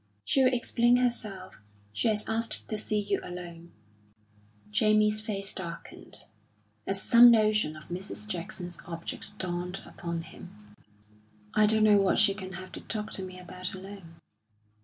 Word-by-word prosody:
"She'll 265 -1 +4
explain 240 -1 +3
herself. 215 -7 -2 0.3
She 170 - 0
has 215 -1 +1
asked 225 +1 -1
to 215 - -2
see 210 0 -1
you 205 - -1
alone." 175 -1 -9 1.0
Jamie's 215 0 +3
face 200 -2 -3
darkened, 170 -4 -9 0.6
as 195 0 0
some 240 +4 +8
notion 215 -7 +3
of 155 - -12
Mrs. 195 +4 -5
Jackson's 180 -2 -5
object 170 +4 -7
dawned 180 0 -3
upon 170 -1 -5
him. 105 -12 -13 0.8
"I 215 0 +5
don't 220 0 +3
know 210 -2 +6
what 195 - +2
she 205 -2 +5
can 190 -1 -7
have 185 +1 -7
to - - -8
talk 215 -1 -5
to - - -1
me 185 0 -8
about 180 +1 -6
alone." 190 -3 -10
195 Hz, 145 wpm, -29 LUFS, 180-215 Hz, 1.0 s, some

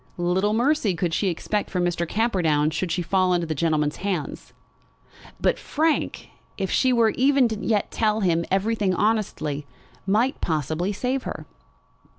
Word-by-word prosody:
Little 185 +4 +1
mercy 240 - +2
could 170 0 -1
she 200 - +1
expect 200 +4 -2
from 180 -1 0
Mr. 170 -1 -1
Camperdown 170 -9 +1
should 180 +1 -2
she 175 +2 -1
fall 185 +1 +2
into 175 -1 0
that 160 - -2
gentleman's 150 -1 0
hands! 185 -6 -4 0.9
But - - +1
Frank, 315 +1 -1 0.3
if 190 -2 -2
she 260 - +3
would 230 -3 +3
even 270 0 +4 0.2
yet 215 -3 0
tell 220 -1 +1
him 170 -3 +2
everything 195 0 +1
honestly, 155 -9 -1 0.4
might 230 +8 +1
probably 160 +4 -1
save 250 +6 -1
her. - - -6
190 Hz, 150 wpm, -24 LUFS, 170-220 Hz, 0.9 s, even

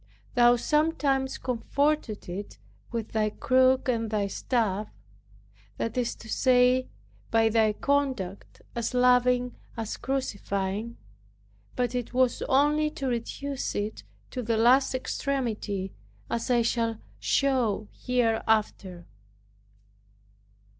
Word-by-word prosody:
Thou 240 -1 +6
sometimes 280 -1 +1
comforted 260 -1 -1
it 190 +4 -6 0.3
with 230 -2 -4
thy 215 -1 +1
crook 260 +4 +3
and 230 -3 0
Thy 210 -2 0
staff; 210 0 -1 0.9
that 230 - -3
is 245 -2 -1
to 225 - -13
say, 250 +1 +3 0.4
by 225 0 +3
Thy 220 -1 +3
conduct 260 -8 -2
as 235 +1 -2
loving 250 0 +3 0.2
as 225 -1 -4
crucifying; 210 -4 -3 0.8
but 245 -1 0
it 245 0 -4
was 255 -1 +2
only 295 +3 +3
to 280 -3 -6
reduce 260 +3 -3
it 210 +1 -3 0.3
to 255 - -3
the 230 -1 0
last 255 +4 +4
extremity, 225 -8 -2 0.4
as 230 +2 -2
I 240 -2 +3
shall 230 -1 0 0.2
show 245 -7 +1
hereafter. 220 -7 0
240 Hz, 105 wpm, -27 LUFS, 220-260 Hz, 0.9 s, Thou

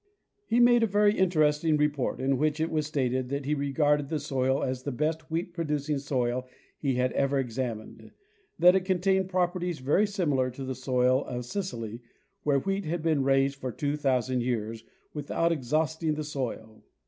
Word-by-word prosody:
He 235 - +2
made 240 0 +6
mea 225 - +3
very 205 +1 +3
inter 180 -5 +2
esting 150 +1 +3
report, 150 -3 0
in 130 0 +1
which 155 +1 +1
it 160 +1 0
was 155 -2 0
stated 130 -4 -1
that 140 0 -3
he 150 - 0
regarded 145 0 +1
the 160 - -1
soil 135 -2 0
as 130 -1 -2
the 140 - -4
best 155 +4 -2
wheat 170 +2 -3
producing 150 -3 -1
soil 130 -2 -1 0.3
he 135 -3 0
had 125 0 +1
ever 140 0 +1
examined; 120 -3 -4 0.5
that 180 +2 +6
it 190 - +2
contained 190 0 +1
properties 180 -2 0
very 145 +11 +2
similar 150 -11 0
to 130 +2 -8
the 130 - -3
soil 130 0 +1
of 125 -1 -5
Sicily, 120 - -5 0.4
where 145 -2 +2
wheat 195 +7 -2
had 160 +1 -2
been 160 -4 +2
raised 135 0 +2
for 130 -2 -4
2,000 130 -2 0
years 115 -2 -2 0.3
without 155 +3 0
exhausting 155 +2 0
the 155 - -3
soil. 125 -7 -5
145 Hz, 175 wpm, -28 LUFS, 130-165 Hz, 0.5 s, made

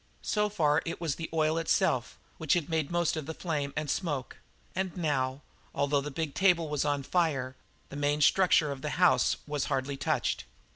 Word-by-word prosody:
So 210 -1 +1
far 160 -6 +2
it 165 - -5
was 165 -4 -1
the 160 +3 -6
oil 160 0 +1
itself, 130 -6 +1 0.2
which 155 -3 +2
had 170 -2 -1
made 160 -3 0
most 175 -1 +1
of 155 -2 -5
the 160 - -5
flame 150 -5 -2
and 155 -1 -2
smoke, 145 -4 -2 0.4
and 190 -1 -2
now, 135 -4 -1 0.3
although 140 0 +1
the 145 - -5
big 150 0 -3
table 175 -4 +3
was 150 -2 0
on 145 -2 0
fire, 135 -6 0 0.3
the - - -9
main 145 +1 0
structure 170 -2 +4
of 135 -1 -6
the 150 +1 -3
house 180 -1 +4
was 145 -2 -2
hardly 135 0 -2
touched. 135 - -1
150 Hz, 190 wpm, -29 LUFS, 140-165 Hz, 0.4 s, structure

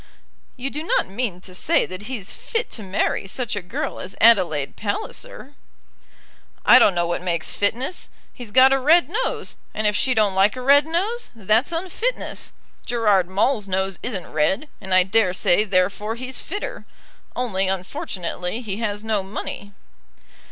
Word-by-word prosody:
"You 265 +2 -4
do 300 - -4
not 325 - +1
mean 195 -3 -3
to 185 - -11
say 180 - +2
that 185 +3 -8
he's 220 -7 -5
fit 465 -1 -3
to 225 - -7
marry 195 0 -1
such 240 +3 -2
a 205 - -3
girl 180 0 -4
as 190 - -7
Adelaide 180 -11 +4
Palliser?" 285 - -5 1.1
"I - - +9
don't 195 - +5
know 175 0 +1
what 175 0 -2
makes 170 -3 -2
fitness. 245 - -1 0.2
He's 245 -3 -9
got 260 +4 +6
a 270 - +2
red 325 +5 +4
nose, 450 +6 -2 0.2
and 215 - 0
if 210 0 +3
she 255 +3 +2
don't 210 -3 +3
like 195 +4 +3
a 255 - -6
red 285 +3 +6
nose, 405 +9 -1
that's 220 - +1
unfitness. 375 +9 -3 0.3
Gerard 210 -7 +2
Maule's 210 +3 +1
nose 190 0 -1
isn't 205 -7 -3
red, 190 - +1
and 190 -1 -7
I 185 0 +6
dare 195 -1 +2
say 185 +2 +3
therefore 195 +3 0
he's 255 +2 -4
fitter. - - -6 0.5
Only, 195 -6 -1
unfortunately, 185 +1 -4
he 205 -4 -4
has 210 -2 -3
no 220 -2 0
money." 200 +1 -6
210 Hz, 165 wpm, -22 LUFS, 190-260 Hz, 1.1 s, I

